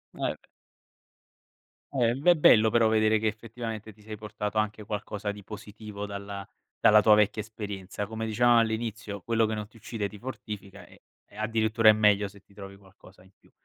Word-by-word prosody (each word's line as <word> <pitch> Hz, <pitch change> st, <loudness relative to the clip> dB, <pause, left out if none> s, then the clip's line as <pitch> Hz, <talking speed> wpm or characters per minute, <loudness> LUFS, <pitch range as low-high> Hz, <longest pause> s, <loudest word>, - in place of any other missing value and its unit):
Eh, -, -, -14 dB
beh. -, -, -3 dB, 1.5 s
Eh, 120 Hz, -3 st, +2 dB
v 140 Hz, -, -9 dB
è 175 Hz, -, +8 dB
bello 110 Hz, -7 st, +6 dB
però 115 Hz, 0 st, +3 dB
vedere 110 Hz, 0 st, +3 dB
che 110 Hz, +1 st, -1 dB
effettivamente 110 Hz, 0 st, -6 dB
ti 105 Hz, -, -22 dB
sei 110 Hz, 0 st, -8 dB
portato 105 Hz, 0 st, -5 dB
anche 105 Hz, 0 st, -1 dB
qualcosa 105 Hz, 0 st, -4 dB
di 100 Hz, -1 st, -11 dB
positivo 105 Hz, 0 st, -8 dB
dalla 100 Hz, 0 st, -7 dB, 0.3 s
dalla 105 Hz, 0 st, +6 dB
tua 105 Hz, 0 st, +6 dB
vecchia 105 Hz, +1 st, +2 dB
esperienza, 105 Hz, -2 st, -6 dB
come 110 Hz, +1 st, -5 dB
dicevamo 120 Hz, +2 st, +4 dB
all'inizio, 110 Hz, -3 st, -2 dB
quello 115 Hz, 0 st, +1 dB
che 110 Hz, -, -2 dB
non 105 Hz, -1 st, -5 dB
ti 115 Hz, -, -20 dB
uccide 110 Hz, -2 st, -4 dB
ti 105 Hz, -, -12 dB
fortifica 105 Hz, -6 st, -8 dB
e -, -, -19 dB, 0.3 s
e -, -, -19 dB
addirittura 110 Hz, 0 st, +3 dB
è -, -, +11 dB
meglio 105 Hz, -1 st, +3 dB
se 100 Hz, +1 st, -16 dB
ti 100 Hz, -, -26 dB
trovi 100 Hz, -1 st, -10 dB
qualcosa 95 Hz, -1 st, -19 dB
in 95 Hz, +1 st, -21 dB
più. -, -, -27 dB
105 Hz, 190 wpm, -28 LUFS, 100-110 Hz, 1.5 s, è